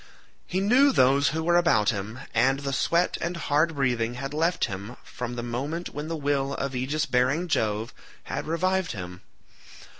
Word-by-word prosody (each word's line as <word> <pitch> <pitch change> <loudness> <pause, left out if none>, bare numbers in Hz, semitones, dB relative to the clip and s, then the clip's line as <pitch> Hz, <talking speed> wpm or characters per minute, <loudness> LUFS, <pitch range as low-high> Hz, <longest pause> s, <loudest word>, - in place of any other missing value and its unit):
He 185 - -1
knew 255 +8 +5
those 140 - +4
who 160 +2 -1
were 175 +1 +3
about 110 -13 +3
him, 105 +2 -5 0.2
and 135 +4 +2
the 140 -1 -3
sweat 170 +6 +1
and 170 +1 -2
hard 155 0 +1
breathing 120 -4 0
had 135 +3 -5
left 165 +3 +1
him 100 +5 -7
from 125 -1 -6
the 120 - -4
moment 140 +9 -3
when 150 +1 -5
the 165 0 -3
will 140 -1 0
of 140 -1 -3
aegis 145 +5 -1
bearing 135 +6 +1
Jove 110 -6 -1 0.3
had - - -5
revived 185 +1 0
him. 90 -3 -7
140 Hz, 175 wpm, -26 LUFS, 120-165 Hz, 0.3 s, knew